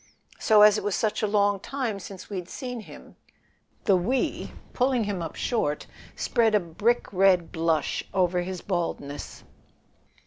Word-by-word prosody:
So, 215 -2 +6
as 210 0 +7
it - - -8
was 205 -2 0
such 215 -2 0
a 215 - +1
long 205 -1 +2
time 235 -3 -3
since 195 -1 -9
we'd 185 -3 -5
seen 250 -3 -5
him 215 - -13 0.3
" - - -40
The 195 - +5
"we," 225 +9 -1 0.2
pulling 250 -2 +2
him 200 -4 -3
up 165 -2 -5
short, 150 -12 -1 0.3
spread 225 -2 +2
a - - +5
brick 205 +8 0
red 185 -3 +4
blush 165 -1 0
over 180 -2 +1
his 185 0 -5
baldness. 165 -6 -4
200 Hz, 160 wpm, -26 LUFS, 180-220 Hz, 0.3 s, as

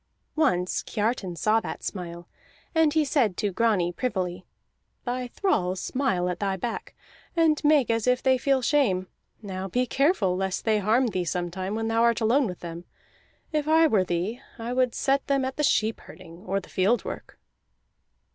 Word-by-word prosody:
Once 185 - +1
Kiartan 210 -4 -2
saw 215 +6 +3
that - - -7
smile, 175 -2 -6 0.5
and 320 -3 +3
he 315 -1 +3
said 240 - +1
to 205 - 0
Grani 195 -4 +1
privily: 185 -3 -3 0.6
"Thy 250 0 -2
thralls 190 - 0
smile 255 -10 0
at 180 -1 -3
thy 195 -2 -1
back, 225 +4 -5 0.4
and 320 -3 +3
make 295 -5 +4
as 230 +1 0
if 250 0 +2
they 260 -1 +3
feel 270 0 +1
shame. 235 -10 +2 0.4
Now 190 -1 -4
be 250 +6 0
careful 270 - +2
lest 190 0 -2
they 215 -2 +3
harm 220 +6 +3
thee 185 -4 -1
sometime 180 +3 -3
when 225 0 -2
thou 225 0 +1
art 235 -1 +3
alone 240 +4 +3
with 180 -2 -7
them. 170 0 -7 0.7
If 305 -1 -1
I 320 +1 +5
were 215 -11 +3
thee, 185 +8 -2 0.2
I 235 +1 -4
would 255 -1 +1
set 275 0 +1
them 275 -1 +1
at 260 - -4
the 300 - 0
sheep 220 -5 +2
herding 170 +4 -13
or 195 +1 0
the 190 - -14
field 200 +6 +1
work." - - -7
225 Hz, 175 wpm, -26 LUFS, 185-265 Hz, 0.7 s, I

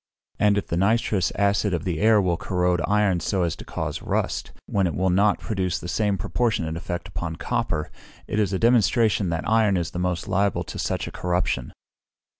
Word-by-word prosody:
And 105 -1 +4
if 100 - -1
the 85 - -2
nitrous 105 0 +2
acid 100 -1 +2
of 85 - -3
the 90 -5 -2
air 110 0 +5
will 90 -3 +1
corrode 90 -1 0
iron 105 -3 +2
so 95 +1 0
as 85 - -1
to - - -9
cause - - -4
rust, - - -2
when 100 -3 +1
it 80 - -3
will 95 +2 +1
not 100 +3 +3
produce 95 -5 -2
the 100 +4 -1
proportionate 105 -8 -1
effect 85 0 -5
upon 80 -2 -4
copper, 95 -7 -2 0.3
it 105 - -2
is 100 -3 +1
a 95 - 0
demonstration 115 -3 +3
that 85 -1 -2
iron 110 -3 +3
is 85 -2 -2
the 90 - -4
most 90 -3 -1
liable 100 0 +1
to - - -8
such - - -1
a - - -6
corruption. 90 -8 -1
95 Hz, 195 wpm, -24 LUFS, 85-105 Hz, 0.3 s, air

